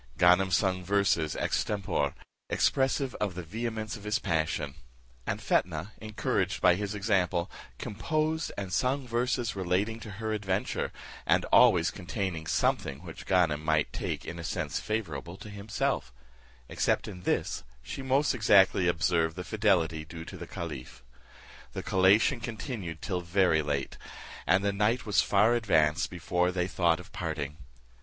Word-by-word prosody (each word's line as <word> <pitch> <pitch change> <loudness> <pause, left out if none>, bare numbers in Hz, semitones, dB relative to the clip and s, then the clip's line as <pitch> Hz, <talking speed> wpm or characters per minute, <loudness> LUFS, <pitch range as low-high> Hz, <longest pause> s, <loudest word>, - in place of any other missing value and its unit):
Ganem 90 +2 +5
sung 95 -1 +1
verses 90 -5 +1
ex - - 0
tempore, 95 -9 -1 0.3
expressive 135 -1 +1
of 100 -4 -1
the 90 - -5
vehemence 110 +4 -4
of 105 - -10
his 105 +1 +1
passion; 80 -6 -1 0.5
and - - -1
Fetnah, 85 +3 0
encouraged 105 -3 -1
by 90 -1 +6
his 100 +3 -3
example, 95 -4 +1 0.3
composed 155 +8 -1
and 95 -2 -4
sung 130 +5 0
verses 120 -1 0
relating 95 +4 0
to 110 -3 -8
her 110 0 -2
adventure, 100 -3 -1 0.4
and - - +3
always - - +6
containing 95 -5 -4
something 70 0 0
which - - -9
Ganem 85 -5 +2
might 80 -1 +1
take - - -3
in 85 - -6
a - - -6
sense 85 -2 -2
favourable 85 -6 -4
to 105 - -10
himself; 100 - -2 0.6
except - - 0
in 95 -4 -8
this, 90 - -1 0.2
she 135 - -6
most 135 +3 +2
exactly 95 -5 +5
observed 85 -1 +1
the 90 - -5
fidelity 90 -7 +1
due 80 +1 -9
to 95 - -9
the 85 -1 -8
caliph. 75 -9 -7 0.7
The - - -4
collation 100 +7 +4
continued 110 - -5
till 90 -3 -2
very 85 -2 +3
late, 70 -2 -3 0.5
and 95 +3 +3
the 100 - +1
night 105 +5 +1
was 105 - +3
far 105 +4 +4
advanced 95 -7 +2
before 90 0 0
they 90 -1 -1
thought 85 -3 +2
of 90 - -12
parting. 80 -4 -4
95 Hz, 150 wpm, -29 LUFS, 85-110 Hz, 0.7 s, by